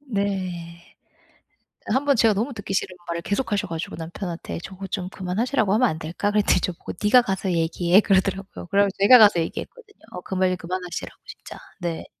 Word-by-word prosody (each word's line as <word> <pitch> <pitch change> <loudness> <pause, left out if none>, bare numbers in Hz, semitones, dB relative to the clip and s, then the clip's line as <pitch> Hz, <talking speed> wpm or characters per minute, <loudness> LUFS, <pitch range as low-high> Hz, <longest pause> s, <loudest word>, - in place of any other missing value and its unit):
네. 185 -8 -4 1.1
1 265 +2 +1
번 280 - +4
제가 225 -2 +4
너무 225 +8 -1
듣기 200 -2 -6
싫은 185 -1 -1
말을 170 0 -3
계속하셔 205 +1 -1
가지고 165 0 -5
남편한테 170 +1 -6
"저거 195 0 -8
좀 185 -2 -4
그만하시라고 200 +4 -1
하면 250 +3 +4
안 160 -5 -3
될까?" 175 +6 -2
그랬더니 205 -3 +3
저보고 175 -1 -4
"네가 245 +4 +6
가서 195 -4 -2
얘기해." 170 +2 +3
그러더라고요. 195 -1 0
그래 200 +1 +3
가지고 195 -1 -2
제가 250 +5 +9
가서 205 -5 +6
얘기했거든요. 420 - -6
어 180 - -7
그 190 - -8
말 185 0 +2
그만하시라고 180 0 -6
진짜. - - -11 0.2
네. 170 -2 -3
190 Hz, 415 characters per minute, -23 LUFS, 175-210 Hz, 1.1 s, 제가